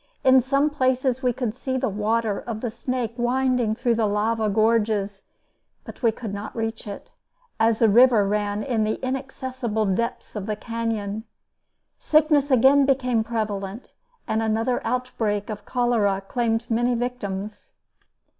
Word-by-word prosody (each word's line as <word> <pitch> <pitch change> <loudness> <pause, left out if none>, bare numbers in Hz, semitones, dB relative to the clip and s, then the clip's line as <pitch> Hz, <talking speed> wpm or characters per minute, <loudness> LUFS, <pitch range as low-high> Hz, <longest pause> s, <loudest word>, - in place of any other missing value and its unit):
In 260 0 +6
some 275 +4 +1
places 260 -2 +1
we 250 -2 +2
could 240 -3 -3
see 260 +1 -3
the - - 0
water 215 +1 0
of 225 -2 -6
the 240 - -2
Snake 245 0 -3
winding 250 -2 +1
through 240 +1 +1
the 225 -2 +1
lava 215 +1 0
gorges; 210 -2 +1 0.6
but - - -11
we 230 -3 +4
could 220 -2 -7
not 205 +1 -6
reach 225 -1 -4
it, 200 - -8 0.5
as 225 0 +3
the 225 - +4
river 230 -1 +5
ran 205 0 -1
in 235 -5 0
the 215 0 -1
inaccessible 260 -4 -3
depths 230 +6 -2
of 205 -1 -4
the 215 - -1
canyon. 220 -1 -3 0.7
Sickness 300 -2 +3
again 270 +2 +5
became 250 -4 +2
prevalent, 215 -1 -4 0.3
and 220 - 0
another 225 +3 0
outbreak 220 -5 -2
of 210 -1 -7
cholera 235 -6 +1
claimed 230 -1 0
many 240 +2 +1
victims. 215 -4 -5
230 Hz, 145 wpm, -24 LUFS, 215-250 Hz, 0.7 s, In